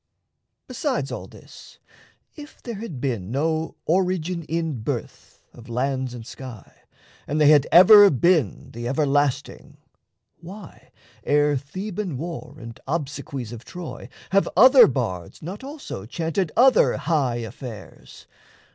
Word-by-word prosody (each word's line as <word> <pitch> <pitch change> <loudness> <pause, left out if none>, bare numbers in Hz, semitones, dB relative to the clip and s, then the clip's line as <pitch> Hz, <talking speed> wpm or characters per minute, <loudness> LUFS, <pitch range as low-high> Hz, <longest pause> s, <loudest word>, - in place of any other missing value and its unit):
Besides - - -2
all - - -6
this, - - -15 0.6
If 295 -1 -12
there 240 - -5
had 190 - -7
been 115 -8 -3
no 160 +5 -1
origin 180 -1 0
in 160 -6 -3
birth - - -6
Of 120 0 -14
lands 130 +1 -2
and 115 -2 -9
sky, 125 -3 -11 0.5
and 150 +2 -1
they 150 -1 +6
had 150 -2 +5
ever 205 +3 +9
been 165 +2 +1
The 120 +1 -6
everlasting, 145 0 -1 0.6
why, 170 - -12 0.3
ere 145 0 +2
Theban 185 +4 -5
war 165 +4 -7
And 115 -1 -10
obsequies 140 -5 -4
of 120 0 -9
Troy, 175 -8 -9 0.2
have 195 +1 +2
other 255 +4 +8
bards 110 - -4
Not 190 +9 -7
also 275 - -8
chanted 165 - -2
other 255 +2 +5
high 145 -5 0
affairs? 115 -2 -9
150 Hz, 125 wpm, -23 LUFS, 125-180 Hz, 0.6 s, ever